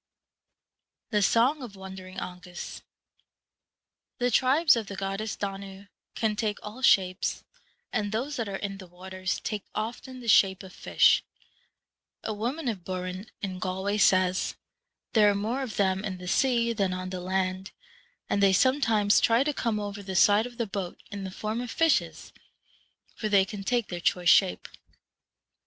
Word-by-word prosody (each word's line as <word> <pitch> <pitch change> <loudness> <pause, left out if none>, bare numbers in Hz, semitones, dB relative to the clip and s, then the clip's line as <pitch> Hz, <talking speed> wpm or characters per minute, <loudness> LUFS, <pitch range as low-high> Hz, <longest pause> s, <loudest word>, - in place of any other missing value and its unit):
The 210 -2 +2
Song 245 +8 +3
of 235 -6 -8
Wandering 190 -1 -9
Aengus. 180 -1 -7 1.4
The 245 0 +1
Tribes 275 +6 +5
of 225 -3 -3
the 200 - -6
goddess 195 +3 -3
Danu 195 0 -6 0.3
can 220 -2 0
take 210 -1 -1
all 215 +5 -8
shapes, 185 -7 +2 0.5
and 205 -1 -1
those 260 +7 -2
that 225 -4 -2
are 195 - -4
in 195 0 -5
the 185 - -10
waters 185 +1 -4
take 210 -3 -3
often 240 +4 -5
the 240 - -9
shape 195 -3 +4
of 185 -1 -11
fish. - - +3 1.0
A 220 - -2
woman 250 +8 -3
of 205 -7 -2
Burren, 185 +2 -5
in 185 -2 -4
Galway, 190 +3 -2
says, 185 -2 +3 0.3
' - - -57
There 210 -2 +6
are 205 - +1
more 225 +7 -1
of 250 -5 -5
them 190 -1 +1
in 195 -3 -4
the 180 0 -9
sea 235 +1 +2
than 195 -4 0
on 185 0 -5
the 185 - -4
land, 185 +1 -1 0.6
and 200 - 0
they 195 -1 +5
sometimes 225 -3 +3
try 230 +3 +4
to 295 +1 -1
come 230 -5 -1
over 205 0 -5
the 190 -1 -6
side 205 +5 +5
of 240 -1 -14
the 235 - 0
boat 195 -3 -5
in 200 -1 -5
the - - -4
form 215 +4 -3
of 245 - -5
fishes, 325 +4 +1 0.8
for 215 - -3
they 200 -2 +5
can 195 +1 -7
take 240 +1 0
their 175 - -4
choice 175 0 +2
shape.' 90 - +4
200 Hz, 170 wpm, -27 LUFS, 190-230 Hz, 1.4 s, There